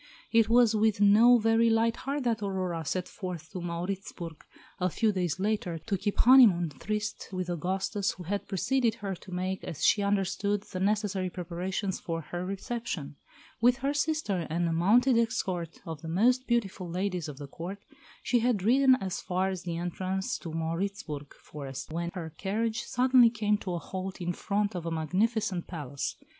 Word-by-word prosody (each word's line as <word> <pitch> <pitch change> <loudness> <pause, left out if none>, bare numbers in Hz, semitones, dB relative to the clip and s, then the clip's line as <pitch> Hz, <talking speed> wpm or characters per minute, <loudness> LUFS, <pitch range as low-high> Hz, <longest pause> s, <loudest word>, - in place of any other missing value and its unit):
It 230 -1 +4
was 235 -1 +5
with 215 -1 +2
no 220 +4 +7
very 225 +1 +3
light 225 +1 +3
heart 280 +2 -3
that 230 -3 0
Aurora 185 -4 -2
set 180 +4 -2
forth 180 -5 -7
to 185 - -5
Mauritzburg, 175 -1 -5 0.4
a 180 0 +1
few 220 +5 +1
days 180 -3 -1
later, 200 -4 -1
to 195 +6 -2
keep 200 +2 -2
"honeymoon 225 -10 +7
tryst" 210 +9 -4
with 185 -2 -3
Augustus, 190 +4 -1
who 180 - -10
had 200 +4 -3
preceded 230 +4 +1
her, 200 -4 -4
to 185 - -13
make, 185 +1 -2
as 160 - -3
she 205 - +4
understood, 200 0 0
the 185 - -6
necessary 200 -1 0
preparations 180 +2 -3
for 165 -1 -3
her 175 +3 -5
reception. 195 -6 -4 0.5
With 245 +1 +5
her 280 - +2
sister 290 - 0
and 170 +2 0
a 165 - 0
mounted 230 +9 +4
escort 185 -7 -2
of 160 -3 -6
the 165 - -7
most 245 +9 +3
beautiful 195 -6 -1
ladies 180 -1 -2
of 140 - -8
the 145 - -7
Court, 175 +7 -6 0.5
she 245 - +2
had 230 -5 +1
ridden 260 +4 +5
as 190 -7 -4
far 185 +1 0
as 185 -2 -4
the 170 -2 -4
entrance 185 +2 -2
to 170 - -7
the 160 - -6
Mauritzburg 165 -3 -3
forest, 140 -1 -8
when 170 +1 -2
her 160 -4 -6
carriage 220 +5 -1
suddenly 250 -1 +5
came 210 -2 0
to 185 -4 -4
a - - -1
halt 190 +2 -6
in 175 0 -2
front 205 +3 -1
of 175 -2 -4
a - - 0
magnificent 185 +4 0
palace. 145 -5 -4
190 Hz, 180 wpm, -29 LUFS, 175-220 Hz, 0.5 s, no